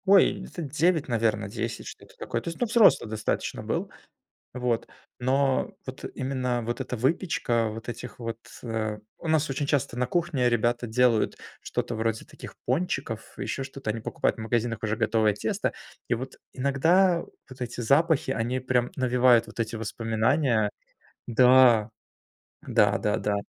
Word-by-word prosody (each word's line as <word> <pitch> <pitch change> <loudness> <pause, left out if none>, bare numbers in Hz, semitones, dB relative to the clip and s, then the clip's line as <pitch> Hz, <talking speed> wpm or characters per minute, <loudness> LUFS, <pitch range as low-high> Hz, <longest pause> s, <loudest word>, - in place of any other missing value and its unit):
Ой, 195 0 +5
где-то 185 -2 -7
9, 155 +2 +1
наверно, 110 -4 0
10, 100 - -4
что-то - - -11
такое. - - -3
То - - -13
есть, 165 - -8
ну, 245 - +2
взрослый 225 - +5
достаточно 110 0 -2
был. - - -2 0.6
Вот. 125 -2 -1 0.3
Но 135 +1 +1
вот 130 +1 -8
именно 130 -2 -1
вот 120 +1 -3
эта 125 - -3
выпечка, 125 - +1
вот 110 +2 -8
этих 120 -1 -8
вот. 115 -1 -5 0.2
У 110 +5 -5
нас 155 -2 +2
очень 140 +2 -1
часто 140 -4 0
на 125 - +1
кухне 165 -7 +1
ребята 120 +1 +1
делают 120 0 +2 0.2
что-то 120 - -3
вроде 110 0 -1
таких - - -11
пончиков, 130 -5 -2
ещё 135 - -3
что-то, 135 -3 -5
они 115 +1 -3
покупают - - -1
в - - -8
магазинах 115 0 -1
уже 110 0 0
готовое 110 -1 +2
тесто, - - -1 0.4
и 120 - +2
вот 130 +3 -6 0.2
иногда 165 +7 +3 0.3
вот 130 0 -13
эти 125 0 -4
запахи, 140 +4 +3
они 125 +2 -1
прям 125 -1 +1
навевают 125 -2 +4
вот - - -8
эти 115 0 -2
воспоминания 115 +2 +1 0.6
Да. 125 -2 +6 0.8
Да - - +4
да, 105 - 0
да. 105 - 0
125 Hz, 155 wpm, -27 LUFS, 115-135 Hz, 0.8 s, Да